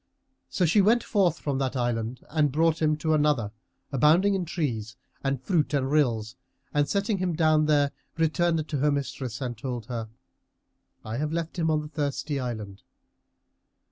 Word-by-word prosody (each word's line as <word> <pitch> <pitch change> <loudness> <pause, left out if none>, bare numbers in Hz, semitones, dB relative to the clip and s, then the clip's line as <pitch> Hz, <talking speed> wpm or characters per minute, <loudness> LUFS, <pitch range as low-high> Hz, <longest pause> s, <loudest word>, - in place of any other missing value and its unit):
So 180 - +1
she 185 +6 +4
went 225 +4 +4
forth 185 -6 +2
from 140 -2 -2
that 135 0 -1
island 120 -1 -2
and 150 -3 +2
brought 160 +3 +2
him 155 -1 +2
to 155 +1 0
another 145 -8 +2 0.4
abounding 160 +9 +4
in 190 -2 -1
trees 120 - -3 0.3
and 135 -1 0
fruits 150 +1 0
and 135 -1 0
rills 120 -6 +1 0.4
and, 145 -1 +2
setting 200 0 0
him 180 -3 -1
down 155 -1 +3
there, 145 -2 +3 0.3
returned 165 0 +1
to 150 - -2
her 150 +2 +3
mistress 135 -4 -3
and 125 -2 -3
told 120 -1 -5
her, 115 -2 -5 1.0
"I 110 +1 -4
have 150 +2 -1
left 165 +1 -3
him 160 -1 +1
on 155 -1 +2
the - - -7
Thirsty 145 -1 -2
Island." 110 -6 -5
150 Hz, 170 wpm, -27 LUFS, 125-165 Hz, 1.0 s, she